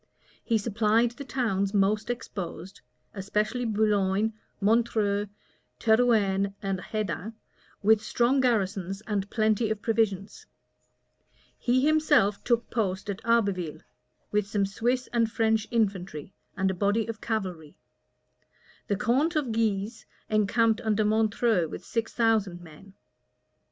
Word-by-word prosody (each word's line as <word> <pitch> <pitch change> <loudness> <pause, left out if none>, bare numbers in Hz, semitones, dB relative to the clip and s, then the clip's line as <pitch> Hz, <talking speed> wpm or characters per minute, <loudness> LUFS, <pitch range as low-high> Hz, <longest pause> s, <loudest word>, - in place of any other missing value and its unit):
He 230 - +2
supplied 225 +2 +2
the 240 +4 -9
towns 220 -7 -1
most 205 +2 +2
exposed, 190 -6 -6 0.3
especially 210 +5 -1
Boulogne, 210 -1 +1 0.3
Montreuil, 210 -1 +1 0.5
Terouenne, 210 -4 +2
Hedin 200 +2 -3 0.5
with 215 +1 +5
strong 240 +5 +1
garrisons 195 -5 0
and 205 -2 -3
plenty 215 0 +1
of 215 -1 -3
provisions: 215 -3 -1 1.1
he 255 +2 +1
himself 295 -10 +3
took 235 -1 0
post 195 -3 -1
at 200 - -7
Abbeville, 200 -9 0 0.5
with 210 -1 +1
some 205 -1 0
Swiss 240 +6 -1
and 230 -2 +2
French 220 -1 +1
infantry, 190 -8 -2 0.2
and 190 0 +1
a - - -3
body 205 +4 +1
of 230 -1 -6
cavalry: 185 -9 -4 1.1
the 200 - 0
count 275 - +1
of 285 -6 0
Guise 220 0 -1 0.2
encamped 220 +2 +2
under 215 -1 +1
Montreuil 215 -3 +2
with - - -8
six 230 -1 -2
thousand 220 -6 +1
men. 175 +4 -15
215 Hz, 115 wpm, -27 LUFS, 195-230 Hz, 1.1 s, with